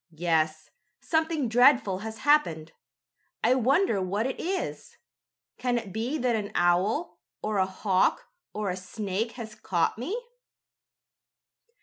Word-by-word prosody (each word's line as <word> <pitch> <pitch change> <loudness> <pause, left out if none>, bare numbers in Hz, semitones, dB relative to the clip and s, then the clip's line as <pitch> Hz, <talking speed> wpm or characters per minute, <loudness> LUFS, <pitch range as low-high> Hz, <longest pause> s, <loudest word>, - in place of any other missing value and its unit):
"Yes, 155 -2 0 0.3
something 320 -4 0
dreadful 240 -5 +4
has 220 +2 -6
happened. 165 - +3 0.7
I - - +5
wonder 260 - +2
what 200 +4 -1
it 265 - -3
is. 375 +2 -4 0.6
Can 245 -1 +1
it 215 -6 -5
be 240 +7 -2
that 245 -4 +1
an 205 -2 -3
owl, 185 - +1 0.2
or 210 -2 0
a 190 - +2
hawk 190 0 +1 0.2
or 210 -2 -2
a - - -3
snake 205 +4 -3
has 225 -3 -8
caught 190 -2 -1
me?" 340 - -2
215 Hz, 125 wpm, -27 LUFS, 185-255 Hz, 0.7 s, I